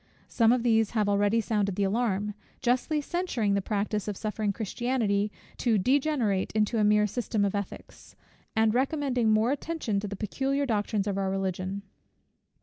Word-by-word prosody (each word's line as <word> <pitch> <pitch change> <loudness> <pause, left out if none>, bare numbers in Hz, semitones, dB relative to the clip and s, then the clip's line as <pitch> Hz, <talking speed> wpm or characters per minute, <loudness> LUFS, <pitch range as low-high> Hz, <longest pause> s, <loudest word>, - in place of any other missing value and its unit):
Some 230 -2 +3
of 245 -1 +2
these 225 -3 +3
have 210 -1 +2
already 205 +2 +2
sounded 205 -3 0
the 200 - 0
alarm; 210 0 0 0.3
justly 255 +5 +1
censuring 285 - -1
the 200 - +1
practice 210 0 -2
of 205 -2 -3
suffering 215 -1 -1
Christianity 215 -1 -1 0.3
to 230 -3 +2
degenerate 255 -3 +1
into 215 +1 +1
a - - +3
mere 210 0 +4
system 210 0 -1
of 195 - -1
ethics, 200 -1 -7 0.4
and 220 -1 +3
recommending 260 -3 +1
more 215 +3 +3
attention 285 -8 -2
to 205 - -4
the 200 - -5
peculiar 270 +8 -1
doctrines 210 -3 0
of 200 -1 -1
our 195 -1 0
Religion. 190 0 -2
215 Hz, 160 wpm, -28 LUFS, 200-245 Hz, 0.4 s, mere